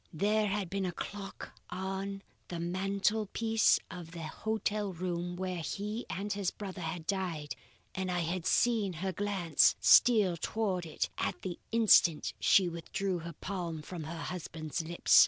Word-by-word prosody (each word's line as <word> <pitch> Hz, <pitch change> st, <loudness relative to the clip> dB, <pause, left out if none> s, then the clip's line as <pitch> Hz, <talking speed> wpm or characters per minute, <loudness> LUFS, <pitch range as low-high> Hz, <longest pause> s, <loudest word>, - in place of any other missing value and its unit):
There 210 Hz, +6 st, +2 dB
had 200 Hz, -1 st, -1 dB
been 195 Hz, +1 st, -1 dB
a -, -, -1 dB
clock 200 Hz, +3 st, -7 dB, 0.2 s
on 195 Hz, +1 st, -4 dB, 0.2 s
the 175 Hz, -, -5 dB
mantelpiece 200 Hz, +5 st, +2 dB
of 170 Hz, -2 st, -8 dB
the 170 Hz, -1 st, -6 dB
hotel 210 Hz, +3 st, -2 dB
room 175 Hz, 0 st, -3 dB
where 185 Hz, -1 st, -3 dB
he 210 Hz, +7 st, -4 dB
and 205 Hz, +2 st, -2 dB
his 200 Hz, -2 st, 0 dB
brother 195 Hz, -3 st, -7 dB
had 160 Hz, 0 st, -4 dB
died 165 Hz, -7 st, -2 dB, 0.4 s
and 190 Hz, 0 st, -2 dB
I 175 Hz, -1 st, 0 dB
had 170 Hz, +1 st, -2 dB
seen 220 Hz, -6 st, +3 dB
her 190 Hz, +4 st, -2 dB
glance 190 Hz, -5 st, +3 dB
steal 210 Hz, -8 st, +6 dB
towards 190 Hz, -4 st, -1 dB
it 155 Hz, -, -2 dB
at -, -, -2 dB
the 180 Hz, -2 st, -4 dB
instant 215 Hz, -8 st, +5 dB
she 190 Hz, -2 st, +5 dB
withdrew 180 Hz, +2 st, -2 dB
her 170 Hz, 0 st, -7 dB
palm 170 Hz, -3 st, -4 dB
from 165 Hz, -1 st, -6 dB
her 165 Hz, +1 st, -5 dB
husband's 165 Hz, -2 st, -4 dB
lips. 170 Hz, +2 st, +5 dB
185 Hz, 155 wpm, -32 LUFS, 170-200 Hz, 0.4 s, steal